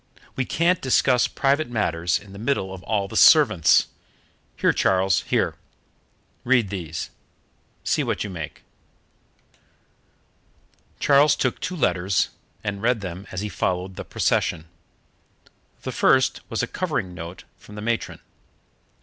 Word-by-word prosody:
We 130 - -1
can't 175 +6 +1
discuss 130 -1 +3
private 140 +1 0
matters 85 -7 0
in 100 -1 -13
the 100 - -10
middle 110 -6 -1
of 95 - -9
all 100 0 -1
the - - -10
servants. 115 - +6 0.7
Here, - - +3
Charles, 95 -1 +2
here; - - 0 0.9
read 120 -5 +2
these. 80 -5 -5 0.7
See - - +1
what - - -2
you 105 - -6
make." 80 -5 -7 2.4
Charles 145 +1 +5
took 130 - -1
two 185 - -4
letters, 90 - +1 0.3
and 100 -1 -4
read 120 -1 +1
them 95 +1 -7
as 95 - -4
he 105 - -3
followed 90 +1 -2
the - - -6
procession. 80 - 0 1.2
The - - -3
first 130 0 +3
was 115 0 -1
a - - -1
covering 130 - -3
note 85 +1 -8 0.2
from 105 - -14
the 105 - -7
matron. 115 0 -2
100 Hz, 130 wpm, -23 LUFS, 90-130 Hz, 2.4 s, servants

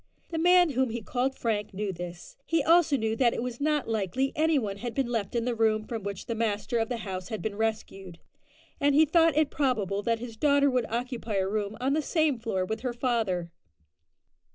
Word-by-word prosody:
The 330 - -3
man 355 -1 +5
whom 260 -1 +1
he 230 0 -5
called 260 +4 -1
Frank 210 -4 -2
knew 200 -1 -2
this. 175 0 -8
He 330 -3 +2
also 325 -2 +4
knew 220 -2 -1
that 240 -2 +3
it - - -2
was 250 +1 -5
not 300 -1 +1
likely 225 +5 -1
any 315 0 +3
one 205 -6 -2
had 235 +2 -5
been 270 - +1
left 230 -3 -3
in 235 -1 0
the 245 - 0
room 220 -1 +2
from 225 -1 -4
which 200 -1 -5
the 230 - -3
master 225 +1 -1
of 225 - -1
the 245 - -2
house 185 -2 -5
had 220 - -4
been 220 -2 -3
rescued, 205 -5 -3 0.6
and 285 -1 +3
he 315 +2 +6
thought 325 -1 +3
it 310 -2 +3
probable 215 -8 0
that 230 +2 0
his 230 -1 -8
daughter 285 +1 +3
would 250 -3 0
occupy 235 -2 -3
a 190 -1 +1
room 210 +1 -2
on 265 +2 +1
the 310 - +1
same 310 -4 +1
floor 195 -5 -1
with 220 +4 -3
her 250 -1 -3
father. 220 -9 -1
235 Hz, 220 wpm, -28 LUFS, 210-275 Hz, 0.6 s, he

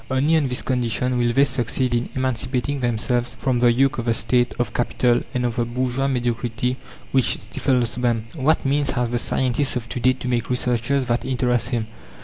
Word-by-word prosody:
Only 140 +5 +2
on 155 -4 +2
this 125 -1 -2
condition 125 0 0
will 120 -1 +2
they 135 +3 +4
succeed 130 -1 0
in 120 0 0
emancipating 130 +2 -1
themselves 120 0 0
from 130 -3 0
the 120 0 +5
yoke 135 +2 +2
of 115 - -3
the 115 -1 +2
State, 120 +2 +1
of 120 - -2
Capital, 120 0 +1
and 125 0 0
of 120 -1 -2
the 120 - +2
bourgeois 130 +2 -1
mediocrity 125 -1 -1 0.3
which 130 -3 +2
stifles 125 -3 -1
them. 120 -3 0
What 155 0 +1
means 140 +1 +1
has 120 -1 0
the 120 - +1
scientist 130 +3 0
of 120 -2 -3
to - - -4
day 130 +2 +4
to 130 - -7
make 120 -2 -1
researches 125 +2 0
that 120 0 0
interest 125 -3 0
him? 120 -3 -1
125 Hz, 195 wpm, -22 LUFS, 120-130 Hz, 0.3 s, the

